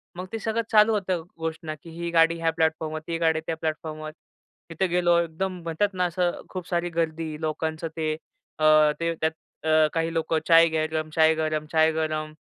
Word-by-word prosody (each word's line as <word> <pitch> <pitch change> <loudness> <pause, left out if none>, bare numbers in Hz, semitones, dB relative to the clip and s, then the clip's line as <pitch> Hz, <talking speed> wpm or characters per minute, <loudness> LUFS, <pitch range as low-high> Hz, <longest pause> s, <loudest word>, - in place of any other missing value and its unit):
मग 180 +1 -5
ते 225 - -3
सगळं 220 +1 -1
चालू 215 0 +6
होतं 185 -5 -1
घोषणा, 160 -1 -4
की 170 - -11
ही 170 +1 -5
गाडी 165 0 +4
ह्या 165 0 +1
प्लॅटफॉर्मवर, 160 -1 -1
ती 165 - -2
गाडी 160 -1 +2
त्या 165 - -1
प्लॅटफॉर्मवर. 155 -1 -4 0.6
तिथे 170 +4 0
गेलो 175 -1 +3
एकदम 175 +2 -3
म्हणतात 165 +5 0
ना, 180 -1 0
असं 175 0 -1
खूप 185 -2 -6
सारी 175 0 -1
गर्दी 165 -1 -2
लोकांचं 160 +1 -2
ते 155 -1 0 0.5
अ, 155 - +2 0.3
ते 165 0 0
त्यात 160 0 +2 0.4
अ, 155 0 +5
काही 165 0 -1
लोकं 160 0 0
चाय 165 0 +7
गरम, 155 0 -1
चाय 160 0 +5
गरम, 155 -1 -1
चाय 160 0 +4
गरम, 155 -1 -2
165 Hz, 185 wpm, -25 LUFS, 160-170 Hz, 0.6 s, चाय